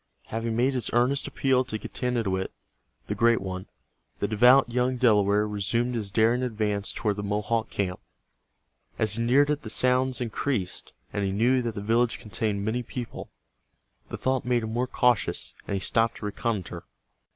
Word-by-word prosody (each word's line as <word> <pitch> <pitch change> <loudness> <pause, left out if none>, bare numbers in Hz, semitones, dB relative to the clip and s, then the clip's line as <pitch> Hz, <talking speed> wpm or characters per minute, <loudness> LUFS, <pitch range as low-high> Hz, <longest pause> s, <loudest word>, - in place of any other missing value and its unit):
Having 115 0 -2
made 130 +4 +2
this 125 -4 0
earnest 125 +4 +2
appeal 130 -1 +2
to 110 - -3
Getanittowit, 110 -6 -2 0.6
the - - -3
Great 115 0 +3
One, 95 -1 -6 0.5
the 100 - -1
devout 125 +5 +6
young 125 +1 0
Delaware 105 -3 +3
resumed 115 +4 -1
his 110 -4 -2
daring 115 +4 +3
advance 105 -4 -1
toward 105 -2 -1
the - - -2
Mohawk 105 +2 -1
camp. 90 -2 -2 1.0
As 110 -1 +1
he 115 - 0
neared 140 +5 +4
it 150 0 -1
the 110 - -7
sounds 125 +2 +2
increased, 120 -4 -2 0.2
and 100 - -1
he 95 - 0
knew 120 +6 +2
that 115 -3 -3
the 100 - -5
village 115 +1 +2
contained 105 -3 -3
many 115 +3 0
people, 120 0 -7 0.8
The - - -5
thought 130 -1 0
made 120 -1 +1
him 110 0 -4
more 125 +2 0
cautious, 125 -3 +1
and 100 - -1
he - - 0
stopped 115 +4 +1
to - - -7
reconnoiter. 100 -5 -3
115 Hz, 170 wpm, -26 LUFS, 105-125 Hz, 1.0 s, devout